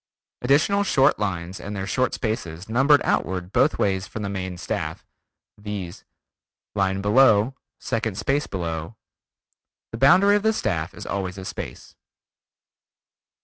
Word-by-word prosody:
Additional 155 +11 +3
short 140 -7 +3
lines 95 -2 -3
and 105 +1 -6
their 95 -1 -3
short 130 +5 0
spaces 100 -6 -4
numbered 135 +6 +4
outward 90 0 -1
both - - +3
ways 95 -1 0
from 110 - -6
the 100 - -2
main 95 -2 -4
staff, - - -4 0.5
viz: 100 -4 -6 0.7
line 95 -1 0
below, 110 +2 +4 0.3
second 115 -4 -2
space 140 +5 0
below. 85 +1 -4 1.0
The - - -6
boundary 185 +9 +6
of 205 - +2
the 220 +1 +2
staff 90 - -2
is - - -8
always 95 -1 -3
a 95 - -7
space. - - -7
105 Hz, 135 wpm, -24 LUFS, 95-130 Hz, 1.0 s, boundary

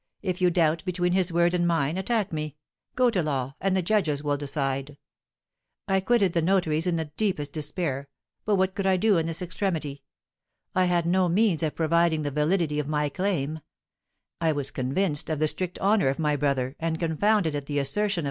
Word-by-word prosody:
If 185 -2 -2
you 180 - +5
doubt 165 -2 +1
between 180 -1 0
his 185 -1 +2
word 170 +1 +2
and 175 -1 +1
mine, 165 -2 +1
attack 205 0 -1
me; 155 -2 -4 0.4
go 250 -1 +3
to 190 -5 +1
law, 135 -4 -2
and 190 0 +1
the 185 - 0
judges 165 -7 +1
will 145 -1 +1
decide.' 140 0 -3 0.9
I 190 0 +2
quitted 195 -3 +2
the 170 - +2
notary's 165 -2 +1
in 175 - +1
the 160 -2 -3
deepest 165 -10 -1
despair. 150 -3 -3 0.4
What 190 -3 +2
could 195 0 -2
I 190 -1 +3
do 200 -1 +3
in 165 - -1
this 165 +2 -2
extremity? 165 -6 -3 0.7
I 185 0 +3
had 175 -2 +1
no 180 +1 +2
means 190 -2 +2
of 155 -2 -1
proving 165 -1 +2
the 145 - -2
validity 150 +1 +1
of 145 - -2
my 150 -1 0
claim; 160 -4 -2 0.8
I 160 -1 +2
was 145 -2 -3
convinced 145 +5 -1
of 155 - -1
the 155 +1 +2
strict 180 +3 -2
honour 200 -3 +2
of 135 - -2
my 150 -2 +1
brother, 135 -2 -1
and 160 0 -1
confounded 170 +1 +1
at 145 -1 -4
the 145 - -2
assertion 200 +9 +2
of - - -7
M. - - +1
165 Hz, 200 wpm, -26 LUFS, 150-185 Hz, 0.9 s, you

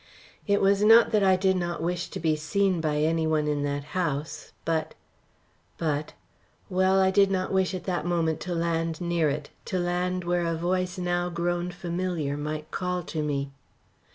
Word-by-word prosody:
It 200 0 +3
was 195 +1 +3
not 225 +2 +7
that 215 - +3
I 190 -1 +5
did 190 0 +2
not 175 -1 -2
wish 175 +2 -2
to 190 - -6
be 160 -2 +1
seen 185 +3 0
by 150 -2 0
any 160 +1 +1
one 155 -1 +1
in 145 -1 0
that 145 0 -2
house. 155 -4 -2
But 160 -1 -1 0.8
but 150 -2 -2 0.6
well, 190 +1 +3
I 190 0 +4
did 195 0 +4
not 190 0 -1
wish 190 0 +1
at 180 - -5
that 180 -2 -2
moment 165 -2 0
to 175 +1 -4
land 165 -1 -1
near 170 -3 +1
it 145 +1 -4
to 185 - -2
land 180 +1 -1
where 175 0 0
a 165 - 0
voice 180 +2 -1
now 175 0 0
grown 175 +1 -1
familiar 175 -4 -3
might 150 +1 -5
call 180 -1 -2
to 155 - -1
me. 140 -2 -2
175 Hz, 180 wpm, -27 LUFS, 160-185 Hz, 0.8 s, not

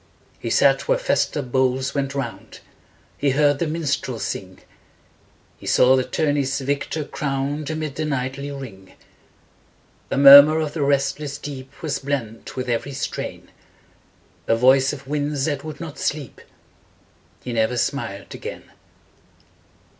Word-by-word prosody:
He - - -4
sat - - +3
where - - +3
festal 330 - 0
bowls 130 +1 0
went 140 -1 -2
round; 140 - -6 0.6
He 145 - +2
heard 145 +1 +3
the 170 - 0
minstrel 145 -6 -2
sing; 95 -3 -5 1.0
He - - -10
saw 130 +1 +5
the 130 - +2
tour 150 +2 0
ney's 135 -1 0
victor 140 +3 -2
crowned 140 +1 -3
Amid 155 -3 -4
the 155 - -1
knightly 135 0 -3
ring. 115 -10 -9 1.2
A - - -1
murmur 140 +3 +10
of 155 -2 -2
the 160 - -3
restless 140 +1 0
deep 135 -1 -9
Was 145 -4 -1
blent 130 -6 -4
with 130 0 -4
every 120 +4 -2
strain, 135 - -5 1.0
A 115 - +3
voice 130 +3 +4
of 140 -2 -9
winds 145 -1 -1
that 145 -3 -2
would 155 -1 -7
not 165 -3 -8
sleep 145 -5 -3 1.0
He 125 - -5
never 115 +2 +1
smiled 115 -6 -3
again. - - -8
140 Hz, 140 wpm, -22 LUFS, 130-145 Hz, 1.2 s, murmur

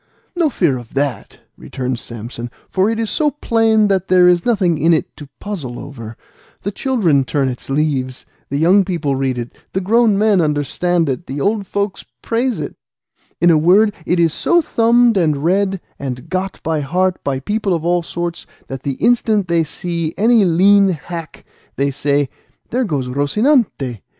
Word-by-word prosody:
"No 340 -3 +2
fear 160 - 0
of 120 +1 -14
that," 140 -3 -3
returned 125 -2 -4
Samson, 120 +1 -7 0.2
"for 190 +2 +2
it 225 0 -2
is 225 -2 -2
so 305 -1 +2
plain 225 -6 +2
that 190 -2 0
there 180 -1 +5
is 180 +4 +3
nothing 185 -9 +2
in 165 +3 +4
it - - -4
to 145 -2 -11
puzzle 155 -13 -5
over; 115 -5 -9 0.5
the 200 - -2
children 200 - +1
turn 135 0 -1
its 125 0 -6
leaves, 135 -3 -1 0.2
the 140 - -2
young 180 +6 +4
people 170 -7 -2
read 130 -1 -1
it, 120 0 -6 0.2
the 190 - 0
grown 215 +2 +3
men 205 -3 +3
understand 160 +3 0
it, 135 +5 -3
the 135 +2 -4
old 200 +4 0
folk 200 0 -2 0.2
praise 240 +1 -1
it; - - -5 0.6
in 175 - +5
a 155 - +4
word, 200 +6 +4
it 175 +1 +1
is 165 -2 +3
so 345 - +2
thumbed, 235 -5 +3
and 155 -5 +1
read, 195 +2 +1 0.2
and 135 +2 -6
got 190 +1 -2
by 160 -1 0
heart 180 +6 -1
by 135 -2 -1
people 205 +7 -2
of 165 -2 -1
all 175 0 +2
sorts, 170 0 -5 0.2
that 135 -1 -6
the 140 - -2
instant 220 - +1
they 170 -1 +2
see 165 0 -4
any 225 0 +4
lean 195 +3 +4
hack, 165 0 -6 0.3
they 140 +1 0
say, 145 +1 0 0.4
'There 250 +1 0
goes 140 - -2
Rocinante. 145 - 0
175 Hz, 175 wpm, -18 LUFS, 140-205 Hz, 0.6 s, there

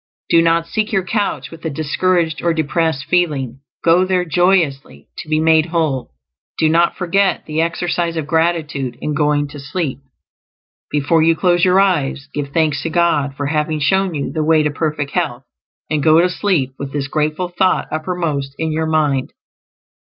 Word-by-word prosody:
Do 165 - +5
not 165 0 +2
seek 215 +6 -2
your 190 -3 0
couch 210 +1 -2
with 165 -1 -12
a 160 - -2
discouraged 160 +3 0
or 170 -1 +1
depressed 160 -2 0
feeling; 145 -7 0 0.2
go 170 +2 +4
there 185 -1 0
joyously, 170 -4 0
to 155 - -8
be 155 0 +2
made 160 0 +3
whole. 150 - -2 0.4
Do 160 - +2
not 170 +2 +3
forget 190 +2 +1
the 155 +1 -1
exercise 170 0 -1
of 160 - -2
gratitude 155 -6 -1
in 150 - -3
going 145 0 +1
to 145 - -10
sleep; 140 -1 -3 0.9
before 150 +3 +2
you 165 +1 +4
close 175 0 +2
your 185 +1 +5
eyes, 145 -7 0
give 145 -1 -3
thanks 155 -1 +1
to 165 - -3
God 155 -5 +1
for 145 - -3
having 150 +1 -1
shown 190 +4 +1
you 140 - -3
the 155 -1 -1
way 155 0 +3
to 150 - 0
perfect 150 -1 -2
health, 145 -8 -2 0.4
and 155 -1 -1
go 160 +2 +5
to 180 +2 +3
sleep 180 -9 0
with 140 -1 -5
this 140 -1 -3
grateful 155 +4 -1
thought 185 +1 +1
uppermost 155 -4 -3
in 160 -1 -2
your 160 +1 -1
mind. 150 -4 0
160 Hz, 175 wpm, -18 LUFS, 145-175 Hz, 0.9 s, Do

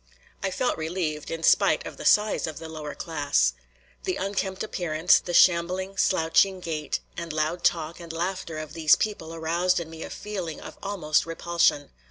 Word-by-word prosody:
I 195 - 0
felt 190 +2 -1
relieved, 160 -2 -3
in 165 0 -5
spite - - +4
of - - -8
the - - -8
size 210 -4 +3
of 155 - -6
the 165 - -7
lower 155 -2 -7
class. 145 - +1 0.5
The - - -1
unkempt 195 0 -2
appearance, 175 -5 +2
the 175 - -6
shambling, 185 +2 +3
slouching 185 +1 +3
gait 155 -4 -3
and 170 -1 -5
loud 155 +3 -1
talk 165 0 0
and 170 -1 -8
laughter 170 -1 -3
of 155 -1 -6
these 160 -3 +5
people 205 -7 -3
aroused 170 +3 +1
in 165 -1 -7
me 165 0 -9
a - - -6
feeling 185 -7 -5
of - - -11
almost 170 -7 0
repulsion. 170 -3 +1
170 Hz, 175 wpm, -26 LUFS, 160-185 Hz, 0.5 s, these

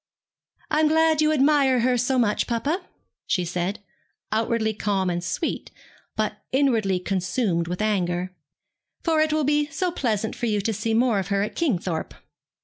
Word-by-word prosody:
'I 305 - +3
am 310 - +4
glad 320 0 +3
you 305 0 +3
admire 275 -3 +3
her 250 +1 +2
so 250 +2 +1
much, 225 -4 +1
papa,' 280 - -1 0.5
she 180 -4 +1
said, 180 +4 -3 0.5
outwardly 220 0 0
calm 195 -3 0
and 175 0 -3
sweet, 180 - -3 0.5
but - - -2
inwardly 230 -9 +2
consumed 185 -1 -1
with 180 +4 -2
anger; 180 -3 -1 0.7
'for 320 -2 +2
it 310 0 +2
will 310 0 +1
be 295 +1 +2
so 360 +3 -2
pleasant 220 - -1
for 240 - -2
you 210 -2 +1
to 220 +3 -1
see 225 +2 -1
more 235 -3 +3
of 190 - -3
her 200 -1 +1
at 210 - -5
Kingthorpe.' 185 - -1
225 Hz, 165 wpm, -24 LUFS, 195-285 Hz, 0.7 s, am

